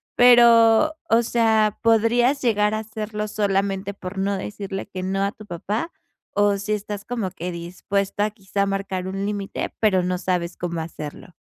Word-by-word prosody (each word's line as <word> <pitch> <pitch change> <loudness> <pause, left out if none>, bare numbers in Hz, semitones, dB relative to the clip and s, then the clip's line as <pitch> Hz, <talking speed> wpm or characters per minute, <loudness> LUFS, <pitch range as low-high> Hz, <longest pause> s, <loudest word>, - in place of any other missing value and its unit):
pero 235 +3 +6 0.2
o 230 - +5
sea, 220 -2 +2
¿podrías 235 +4 +3
llegar 210 -3 +2
a 215 - 0
hacerlo 215 -1 -5
solamente 200 -1 -1
por 190 0 -8
no 200 +1 0
decirle 195 0 -5
que 185 - -6
no 195 +1 -1
a 200 - 0
tu 215 -3 -14
papá, 205 - -3 0.4
o 205 0 +3
si 205 +2 -2
estás 205 0 -4
como 225 -7 -3
que 180 0 -5
dispuesta 195 +4 -2
a 215 - -2
quizá, 200 -1 -2
a - - +1
marcar 195 -2 -3
un 195 +1 -3
límite, 205 -1 -4
pero 190 -5 +3
no 180 0 -1
sabes 180 -1 -2
cómo 170 -2 -3
hacerlo? 155 -2 -8
205 Hz, 175 wpm, -23 LUFS, 190-220 Hz, 0.4 s, pero